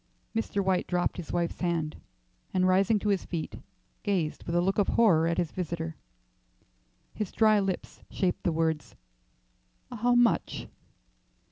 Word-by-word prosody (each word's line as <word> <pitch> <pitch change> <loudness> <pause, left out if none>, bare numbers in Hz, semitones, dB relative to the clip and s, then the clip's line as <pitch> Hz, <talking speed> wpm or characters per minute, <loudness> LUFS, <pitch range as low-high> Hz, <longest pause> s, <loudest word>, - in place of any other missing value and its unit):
Mr. 205 -3 -1
White 190 -1 +1
dropped 180 -1 0
his 175 -4 -6
wife's 170 -1 -1
hand, 170 -4 -1 0.6
and 185 0 +3
rising 195 +4 +4
to 210 +1 -1
his 195 -2 +1
feet, 165 -3 -5 0.4
gazed 180 -7 -1
with 170 - -2
a - - +4
look 195 +3 +1
of 200 - +3
horror 170 -9 +4
at 170 - 0
his 175 -3 0
visitor. 165 -2 -4 1.2
His 210 -4 -3
dry 215 -2 +4
lips 195 -2 -3
shaped 185 -2 -1
the 175 - +1
words, 160 -7 -1 1.0
"How 245 +1 +2
much?" 245 -1 +2
180 Hz, 145 wpm, -29 LUFS, 165-200 Hz, 1.2 s, rising